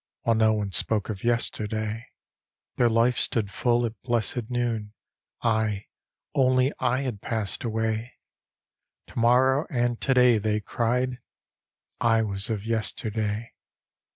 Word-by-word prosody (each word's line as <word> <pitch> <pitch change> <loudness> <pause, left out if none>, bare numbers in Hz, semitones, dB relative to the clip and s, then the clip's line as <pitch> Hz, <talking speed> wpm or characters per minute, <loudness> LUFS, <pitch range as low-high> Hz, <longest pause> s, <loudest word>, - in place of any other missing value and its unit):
While 115 - +2
no 110 0 +4
one 105 -2 -2
spoke 105 +4 0
of 100 -3 -5
yesterday. 110 -1 -1 0.7
Their 120 -1 +3
life 115 +2 +2
stood 105 -4 0
full 120 +2 +1
at 110 -4 -6
blessed 120 -1 -1
noon; 115 -4 -2 0.5
I, 110 -3 0 0.4
only 130 +1 +3
I 125 +1 +1
had 120 -7 -4
passed 110 -4 -2
away: 110 +1 -2 0.9
"To - - -5
morrow 130 +5 +4
and 120 -4 0
to 135 - +2
day," 125 -3 +5
they 105 0 0
cried; 125 +3 -1 0.8
I 115 -1 +3
was 100 -1 -1
of 105 -2 -3
yesterday. 110 -1 -2
115 Hz, 125 wpm, -26 LUFS, 110-120 Hz, 0.9 s, day